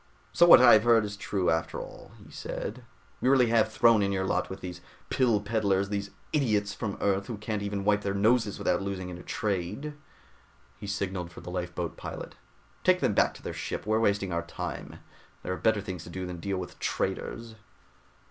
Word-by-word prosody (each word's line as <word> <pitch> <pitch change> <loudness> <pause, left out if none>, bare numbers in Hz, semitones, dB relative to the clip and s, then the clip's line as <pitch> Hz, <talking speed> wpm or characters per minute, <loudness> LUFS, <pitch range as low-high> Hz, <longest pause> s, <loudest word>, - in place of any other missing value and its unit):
"So 175 - +6
what 170 - +10
I 125 - +9
have 110 -1 +6
heard 115 -2 +5
is 100 0 -5
true, 100 -2 0
after 80 0 -1
all," - - -10
he - - -15
said. 125 - -5 0.4
"You 130 - +3
really 130 -3 +5
have 110 -1 +3
thrown 115 -1 +5
in 100 0 +1
your 95 -1 0
lot 90 -1 0
with 95 - -6
these 90 -1 -7 0.3
pill 120 -5 +3
peddlers, 100 -2 0
these 100 0 -3 0.2
idiots 105 -9 +1
from 100 -5 -4
Earth 100 -1 0
who 115 - -5
can't 105 0 -3
even 100 -1 -3
wipe 105 0 +3
their 100 -1 -2
noses 110 +1 +2
without - - 0
losing 95 -2 -4
in 90 -1 -7
a - - -9
trade." 105 - -3 0.9
He 100 - -7
signaled 95 -3 -3
the 90 - -9
lifeboat 90 -2 -4
pilot. - - -7 0.5
"Take - - +4
them - - +1
back - - +3
to - - -13
their - - -4
ship, - - -4
we're 110 +1 +2
wasting 100 -3 +1
our 85 - 0
time. 85 - -7 0.4
There 90 - -2
are - - -4
better 110 -2 +2
things 95 -4 -6
to - - -10
do 95 +1 -5
than 90 -1 -6
to - - -11
deal 100 0 -2
with 90 -1 -7
traitors." 115 -1 -3
100 Hz, 205 wpm, -28 LUFS, 95-110 Hz, 0.9 s, what